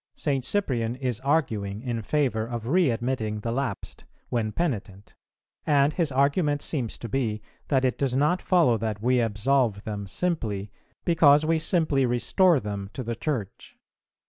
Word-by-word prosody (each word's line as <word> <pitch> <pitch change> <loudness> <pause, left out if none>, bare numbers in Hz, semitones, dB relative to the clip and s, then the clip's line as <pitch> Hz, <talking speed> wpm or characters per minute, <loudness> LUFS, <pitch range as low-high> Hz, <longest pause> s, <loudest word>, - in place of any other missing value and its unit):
"St. 135 -4 -1
Cyprian 125 - 0
is 125 -4 -2
arguing 115 -8 -1
in 120 -3 -2
favour 120 -3 0
of 120 -2 -5
readmitting 120 - 0
the 115 - -3
lapsed, 135 +2 -4 0.3
when 110 -3 -1
penitent; 105 - -3 0.5
and 145 0 +3
his 165 -5 0
argument 145 +2 +1
seems 130 -8 -2
to 115 - -7
be 115 -3 -1 0.3
that 135 -2 +2
it 125 - 0
does 135 -3 0
not 150 +7 +2
follow 165 -11 +3
that 110 -1 -3
we 125 +1 +3
absolve 115 -1 +1
them 105 -2 -5
simply 105 - -2 0.3
because 155 -3 +5
we 165 0 +2
simply 155 -6 +1
restore 140 - +3
them 100 -3 -5
to 130 - -5
the 115 0 -3
Church. 115 -8 -5
125 Hz, 150 wpm, -26 LUFS, 110-145 Hz, 0.5 s, because